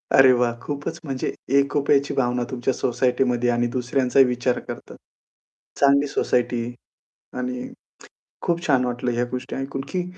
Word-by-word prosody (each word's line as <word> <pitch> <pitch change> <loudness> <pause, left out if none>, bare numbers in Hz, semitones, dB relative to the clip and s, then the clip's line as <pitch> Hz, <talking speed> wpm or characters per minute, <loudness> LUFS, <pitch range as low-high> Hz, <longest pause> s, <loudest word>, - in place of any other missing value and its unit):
अरे 130 -1 +8
वाह! 120 -1 +2
खूपच 145 +3 -5
म्हणजे 135 -4 -3 0.3
एकोप्याची 140 0 +2
भावना 125 -1 +1
तुमच्या 130 +1 -1
सोसायटीमध्ये 125 0 +1
आणि 120 0 +1
दुसऱ्यांचाही 130 +1 +3
विचार 125 0 0
करतात. - - -9 0.8
चांगली 140 +1 +4
सोसायटी 120 -3 0 0.7
आणि 125 0 -3 0.8
खूप 170 0 -1
छान 130 -4 +3
वाटलं 125 0 -2
ह्या 120 +1 0
गोष्टी 130 +1 -4
ऐकून 135 0 -4
की 180 -1 -1
125 Hz, 130 wpm, -23 LUFS, 125-140 Hz, 0.8 s, अरे